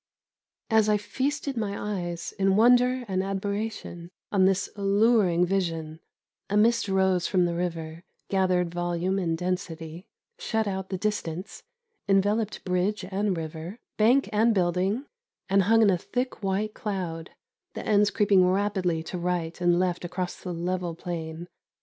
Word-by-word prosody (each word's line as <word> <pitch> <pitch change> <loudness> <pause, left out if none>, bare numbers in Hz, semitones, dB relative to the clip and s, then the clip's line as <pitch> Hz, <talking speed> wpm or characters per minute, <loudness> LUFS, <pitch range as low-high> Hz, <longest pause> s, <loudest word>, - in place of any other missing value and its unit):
As 220 -1 +4
I 210 - +4
feasted 275 +6 -2
my 205 -2 -2
eyes, 170 0 -5
in 195 0 +3
wonder 245 +3 +4
and 190 -1 0
admiration, 195 -2 -4 0.2
on 190 -2 +4
this 190 0 +2
alluring 200 -3 +3
vision, 165 -4 -2 0.5
a 205 - +1
mist 230 +1 +3
rose 190 -2 +2
from 185 -3 +2
the 170 - -1
river, 165 -2 -4 0.3
gathered 180 -3 +1
volume 175 +2 -1
and 165 -3 -1
density, 175 -1 -4 0.3
shut 220 -1 -1
out 190 -1 -3
the 190 - -2
distance, 185 -3 -3 0.5
enveloped 205 +2 +1
bridge 185 +2 0
and 195 -1 0
river, 160 +5 -6 0.2
bank 245 +6 +4
and 220 +2 +3
building, 185 - +1 0.4
and 195 0 +4
hung 225 +4 +4
in 205 - +5
a 180 - +1
thick 250 +6 -3
white 200 +2 -1
cloud, 175 -6 -4 0.5
the - - -5
ends 210 -1 +4
creeping 200 -3 +4
rapidly 185 -4 0
to 180 +2 -5
right 175 -1 -2
and 175 0 +3
left 180 -1 0
across 180 +1 -3
the 180 - -5
level 175 0 -2
plain. 165 -1 -6
190 Hz, 145 wpm, -26 LUFS, 175-210 Hz, 0.5 s, in